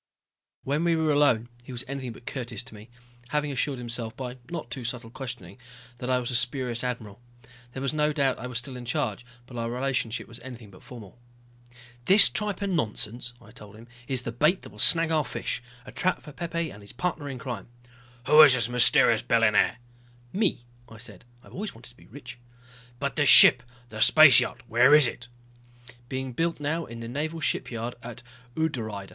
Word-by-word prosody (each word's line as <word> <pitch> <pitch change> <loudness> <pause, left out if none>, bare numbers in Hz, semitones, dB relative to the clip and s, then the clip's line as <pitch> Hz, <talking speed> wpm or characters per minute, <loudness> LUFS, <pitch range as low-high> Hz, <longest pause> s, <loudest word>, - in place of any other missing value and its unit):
When 145 +4 -1
we 170 -1 +2
were 160 -1 +1
alone 140 -6 +2 0.2
he 125 - -11
was 125 0 -5
anything 130 -3 -6
but 120 - -16
courteous 120 -4 -5
to 125 - -14
me, 105 +2 -13 0.4
having 150 +1 -1
assured 135 0 -1
himself 115 -2 -5
by 125 -1 -6
not 160 -9 -7
too 125 0 -4
subtle 115 -1 -5
questioning 115 -7 -8 0.4
that 125 - -5
I 130 - +2
was 125 0 -3
a - - -2
spurious 125 -1 -1
admiral. 115 -4 -6 0.5
There 135 - -6
was 140 - -1
no 150 0 +1
doubt 140 -3 0
I - - -6
was 125 -2 -5
still 125 +2 -6
in 125 -1 -9
charge, 120 -3 -2 0.2
but 125 -1 -11
our 115 0 -3
relationship 125 -2 -3
was 115 - -11
anything 120 -4 -11
but 90 - -17
formal. 115 -3 -13 0.9
"This 195 +3 +8
tripe 205 -2 -2
and 195 -2 -1
nonsense," 120 -1 -3
I 110 -2 -17
told 105 -1 -13
him, 115 +2 -15 0.2
"is 130 -2 0
the 115 - -4
bait 150 +10 +1
that - - -12
will - - -16
snag 165 -1 +5
our 155 -2 +2
fish. - - -4 0.2
A - - -11
trap 185 - -2
for 150 - -11
Pepe 170 +1 -4
and 100 - -13
his 100 - -11
partner 150 0 -4
in 135 - -6
crime." 120 -5 -7 0.6
"Who 150 +3 +7
is 140 -4 +8
this 120 -2 0
mysterious 125 -1 +4
billionaire?" 115 +1 +2 0.6
"Me," 190 - -1 0.2
I 115 - -13
said. 110 -2 -9 0.2
"I've - - -17
always 205 - -6
wanted 120 +3 -13
to - - -24
be - - -19
rich." 125 0 -11 0.6
"But 140 +3 -4
this 145 -3 +4
ship, 125 - +10 0.3
the 110 -1 -7
space 155 -5 +8
yacht, - - -4
where 125 +6 +5
is 150 -2 +6
it?" 120 0 -5 0.8
"Being 130 -1 -5
built 165 +5 -2
now 155 +3 -2
in 115 0 -9
the 115 - -7
naval 155 +6 -4
shipyard 120 -5 -3
at 120 +1 -10 0.3
Udrydde. 110 -11 -3
125 Hz, 200 wpm, -26 LUFS, 115-150 Hz, 0.9 s, ship